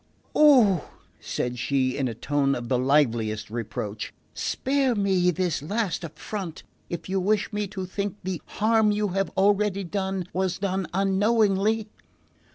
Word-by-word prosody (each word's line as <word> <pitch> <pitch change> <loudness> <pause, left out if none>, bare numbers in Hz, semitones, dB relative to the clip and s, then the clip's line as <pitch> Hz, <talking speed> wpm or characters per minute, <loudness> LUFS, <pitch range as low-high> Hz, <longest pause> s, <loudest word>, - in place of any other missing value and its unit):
"Oh," 245 - +5 0.3
said 125 0 -3
she, 130 0 +1
in 135 -2 0
a 115 - -4
tone 140 +2 +1
of 120 -1 -5
the 125 -2 +2
liveliest 115 -6 +1
reproach, 110 -2 -4 0.2
"spare 270 -2 0
me 190 -3 +2
this 180 -4 0
last 195 +2 -2
affront 170 +2 -6 0.3
if 170 - -5
you 190 +1 0
wish 210 +3 0
me 210 0 -1
to 190 -1 -5
think 200 +1 -3
the 185 -2 -3
harm 220 0 +2
you 210 0 0
have 195 +1 0
already 200 0 +2
done 190 0 -2
was 185 0 0
done 190 -1 -1
unknowingly!" 205 +2 +2
190 Hz, 145 wpm, -25 LUFS, 145-205 Hz, 0.3 s, Oh